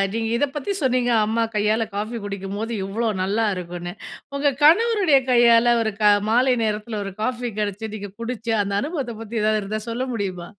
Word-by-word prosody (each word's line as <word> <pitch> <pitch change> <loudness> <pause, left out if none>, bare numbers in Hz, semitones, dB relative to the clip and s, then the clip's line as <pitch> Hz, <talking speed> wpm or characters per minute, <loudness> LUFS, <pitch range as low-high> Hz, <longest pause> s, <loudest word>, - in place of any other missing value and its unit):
நீங்க 225 -1 -1
இத 285 - +1
பத்தி 295 +8 -2
சொன்னீங்க, 250 -2 +1
அம்மா 230 +2 +1
கையால 215 +1 +1
காஃபி 215 +3 -3
குடிக்கும்போது 200 +3 -4 0.2
எவ்ளோ 225 +3 -1
நல்லாயிருக்கும்ன்னு. 180 -4 -2 0.4
உங்க 280 -1 +1
கணவருடைய 370 -2 +5
கையால 235 0 +5
ஒரு 220 -2 -2
க - - +1 0.3
மாலை 250 +2 +4
நேரத்தில 215 0 -2
ஒரு 195 - -6
காஃபி 245 -1 -2
கிடைச்சு, 210 +1 -3
நீங்க 205 -1 -6
குடிச்சு, 230 -1 -3
அந்த 200 0 -3
அனுபவத்த 280 -7 -4
பத்தி 225 0 -3
எதாவது 215 0 +2
இருந்தா 215 +2 -4
சொல்ல 240 +3 -2
முடியுமா? 185 -5 -4
225 Hz, 165 wpm, -22 LUFS, 205-245 Hz, 0.4 s, கணவருடைய